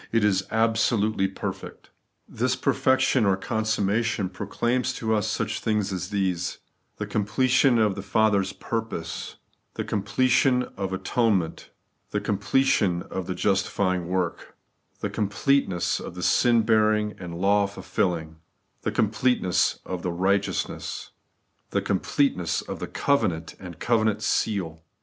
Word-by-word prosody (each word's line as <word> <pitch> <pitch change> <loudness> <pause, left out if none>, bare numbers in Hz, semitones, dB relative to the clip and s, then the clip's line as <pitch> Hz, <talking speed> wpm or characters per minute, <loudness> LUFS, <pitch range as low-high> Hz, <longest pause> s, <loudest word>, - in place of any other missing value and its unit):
It 115 -1 +2
is 95 -2 +2
absolutely 110 -2 +2
perfect 95 - -7 0.4
This - - 0
perfection 130 -1 +2
or 100 -2 +3
consummation 110 -1 0
proclaims 120 +6 -1
to 110 -3 -1
us 105 -2 +1
such - - -2
things 105 -3 0
as 90 0 -4
these: 95 -4 -1 0.4
the - - -3
completion 125 +4 +2
of 105 -3 +3
the 100 - -6
Father's 100 -2 +2
purpose, 110 -8 -4 0.4
the - - -2
completion 125 +5 +2
of 95 -1 -3
atonement, 95 -2 0 0.4
the - - -1
completion 100 -4 +1
of 95 -2 -4
the 90 - -3
justifying 95 -2 0
work, 90 -1 -3 0.4
the - - -1
completeness 105 -2 +1
of - - -8
the - - -5
sin 120 -2 +4
bearing 110 -1 +2
and 85 -2 -6
law 100 +1 +3
fulfilling, 85 -5 -2 0.4
the - - -1
completeness 110 -3 +1
of 90 -1 -4
the 90 - -2
righteousness, 95 +4 -1 0.6
the - - +1
completeness 115 - 0
of - - -6
the - - -4
covenant 95 - 0
and 90 -3 -9
the - - -24
covenant 110 -2 +1
seal. 85 -7 -1
105 Hz, 130 wpm, -25 LUFS, 95-115 Hz, 0.6 s, sin